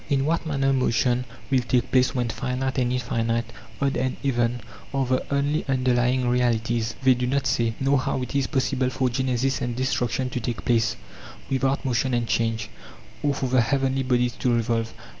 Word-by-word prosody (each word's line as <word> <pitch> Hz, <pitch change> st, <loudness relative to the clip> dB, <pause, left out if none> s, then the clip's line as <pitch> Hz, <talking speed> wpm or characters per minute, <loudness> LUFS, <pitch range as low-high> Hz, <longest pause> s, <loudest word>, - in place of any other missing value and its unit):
In 135 Hz, -2 st, +2 dB
what 165 Hz, +1 st, 0 dB
manner 135 Hz, -2 st, +1 dB
motion 125 Hz, -1 st, +1 dB, 0.3 s
will 130 Hz, -, +4 dB
take 125 Hz, 0 st, 0 dB
place 130 Hz, +1 st, +3 dB
when 120 Hz, -2 st, 0 dB
finite 130 Hz, +2 st, -2 dB
and 125 Hz, -1 st, +1 dB
infinite, 115 Hz, -2 st, -1 dB, 0.3 s
odd 140 Hz, -1 st, +1 dB
and 130 Hz, +1 st, -1 dB
even, 120 Hz, -3 st, +1 dB, 0.4 s
are 135 Hz, -1 st, +1 dB
the 130 Hz, +1 st, 0 dB
only 140 Hz, +2 st, +1 dB
underlying 125 Hz, -1 st, +2 dB
realities, 120 Hz, -2 st, +1 dB
they 130 Hz, -1 st, +6 dB
do 125 Hz, 0 st, -2 dB
not 140 Hz, +1 st, 0 dB
say;.nor 135 Hz, +1 st, +1 dB
how 130 Hz, -1 st, -1 dB
it 125 Hz, -, -6 dB
is 140 Hz, -2 st, +2 dB
possible 130 Hz, -2 st, 0 dB
for 130 Hz, -1 st, 0 dB
genesis 130 Hz, +1 st, 0 dB
and 120 Hz, -1 st, -2 dB
destruction 125 Hz, 0 st, -1 dB
to 125 Hz, -, -2 dB
take 120 Hz, -1 st, -4 dB
place 115 Hz, -2 st, +2 dB, 0.6 s
without 135 Hz, +1 st, 0 dB
motion 125 Hz, 0 st, +1 dB
and 120 Hz, -1 st, -1 dB
change, 115 Hz, 0 st, 0 dB, 0.5 s
or 145 Hz, -1 st, +1 dB
for 135 Hz, -, -2 dB
the 130 Hz, -1 st, +3 dB
heavenly 135 Hz, +2 st, +1 dB
bodies 125 Hz, -2 st, +1 dB
to 125 Hz, -, +1 dB
revolve. 115 Hz, 0 st, 0 dB
125 Hz, 180 wpm, -24 LUFS, 120-135 Hz, 0.6 s, they